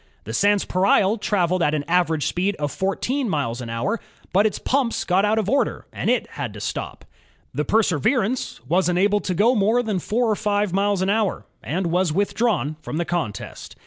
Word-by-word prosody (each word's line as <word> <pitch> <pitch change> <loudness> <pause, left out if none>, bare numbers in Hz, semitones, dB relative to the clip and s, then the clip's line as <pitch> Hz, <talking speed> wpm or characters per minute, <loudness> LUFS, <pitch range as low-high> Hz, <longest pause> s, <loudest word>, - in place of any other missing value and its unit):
The 110 - -7
Sanspareil 200 - +2
traveled 185 -3 +1
at 150 -1 +2
an 145 - -1
average 170 -3 +1
speed 195 +3 0
of 145 -1 -3
fourteen 235 +7 -1
miles 130 -7 -2
an 120 - -6
hour, 135 - -1 0.3
but 200 +3 +5
its 210 - -3
pumps 260 -3 0
got 190 +3 +2
out 215 +1 +2
of 215 -3 0
order 275 +5 0
and - - -2
it - - +2
had - - -5
to - - -7
stop. - - -5 0.5
The - - -1
Perseverance 220 - +1
was 180 +4 +2
unable 200 +4 +2
to 185 -3 -3
go 220 +7 +4
more 225 +2 +2
than 210 -5 -1
four 230 +7 0
or - - +2
five 205 -2 0
miles 200 -1 +1
an 195 - +1
hour, 210 -3 0 0.2
and 175 +1 -2
was 180 -1 +2
withdrawn 200 - 0
from 155 - -5
the 170 - -1
contest. 160 - -4
195 Hz, 190 wpm, -22 LUFS, 170-215 Hz, 0.5 s, but